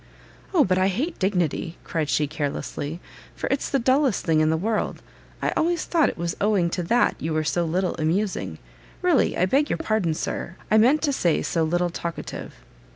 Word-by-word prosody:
"O 340 -6 +5
but 185 0 +2
I 185 - +3
hate 270 - -2
dignity!" 180 -4 0
cried 155 -3 -2
she 150 - +2
carelessly, 145 +1 -4 0.4
"for - - -4
it's 275 - 0
the 275 - +2
dullest 260 - +2
thing 160 -3 +3
in 155 0 +3
the 160 - +2
world. 215 +5 -2 0.4
I - - +1
always 340 0 +1
thought 330 -4 +3
it - - -7
was 170 0 -2
owing 200 -5 +2
to 180 - -1
that 235 +8 +2
you 160 0 -2
were 155 - +1
so 155 +3 0
little 180 +3 0
amusing; 185 +6 -1 0.5
really 355 -6 +3
I 180 - +3
beg 275 +10 +2
your - - 0
pardon, 195 -8 0
Sir, 175 - -4 0.2
I 215 - +6
meant 265 +8 +4
to 290 -3 +2
say 175 -10 +1
so 165 - 0
little 175 +2 +1
talkative." 170 0 -6
185 Hz, 195 wpm, -24 LUFS, 165-245 Hz, 0.5 s, I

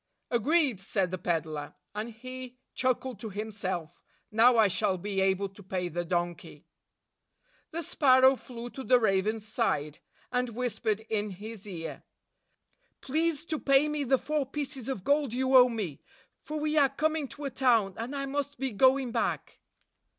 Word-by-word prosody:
"Agreed," 265 - +2
said 195 -2 -1
the 185 - -2
peddler; 155 -4 -2 0.2
and 215 +3 -4
he 255 +2 -9 0.2
chuckled 255 -3 -1
to 220 - -6
himself, 195 -5 -4 0.3
"Now 230 +3 +6
I 220 -2 +6
shall 185 0 +1
be 195 +1 -2
able 190 +1 +2
to 195 +1 -15
pay 185 -2 -3
the 175 +1 -2
donkey." 175 0 -3 1.0
The 335 +1 -4
sparrow 260 -2 +5
flew 240 -1 -8
to 265 - -7
the 250 -1 +5
raven's 215 +1 +1
side, 155 - -1 0.3
and 250 -2 -1
whispered 220 -3 -1
in 215 -1 -2
his 210 +2 -9
ear, 165 -4 -6 1.0
"Please 315 +2 0
to 315 -3 -3
pay 275 +1 +4
me 300 -1 -1
the 265 0 +3
four 300 0 -1
pieces 275 -3 -5
of 215 -9 -3
gold 285 -2 +2
you 260 +1 +1
owe 250 -1 +9
me; 205 - -4 0.4
for 305 0 -5
we 305 +1 0
are 280 -2 +5
coming 310 +1 0
to 290 +2 -9
a 275 - -2
town, 230 -7 +3
and 235 +5 -5
I 275 0 -2
must 285 +1 -3
be 265 -1 -2
going 260 +3 +3
back." 230 - -2
235 Hz, 165 wpm, -29 LUFS, 195-270 Hz, 1.0 s, owe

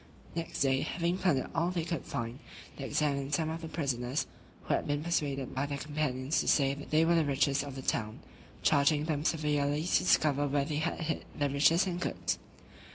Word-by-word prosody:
Next 165 -1 -4
day, 135 -1 +3
having 175 +1 -1
plundered 155 -9 +1
all 165 +2 +1
they 175 -2 -1
could 170 -4 -3
find, 115 +2 -4 0.4
they 135 - -6
examined 145 -1 0
some 160 0 -1
of 165 +1 -5
the 165 - -5
prisoners 135 -4 -1 0.4
(who - - 0
had - - 0
been 145 +1 -1
persuaded 145 -6 -1
by 135 +2 -1
their 140 -1 -3
companions 145 -1 -1
to - - -1
say 135 -2 +4
they 155 +3 +1
were 170 - +4
the 165 -1 +4
richest 140 -1 +2
of 140 -2 -7
the 130 - -6
town), 110 -3 -1 0.4
charging 145 +1 +3
them 150 -2 -1
severely 150 -2 +1
to 180 - +3
discover 145 -5 +3
where 140 0 +1
they 150 0 -2
had 160 +2 -1
hid 160 -1 -2
their 145 -1 +1
riches 155 +6 +4
and 175 -2 -3
goods. - - -2
145 Hz, 200 wpm, -31 LUFS, 140-160 Hz, 0.4 s, say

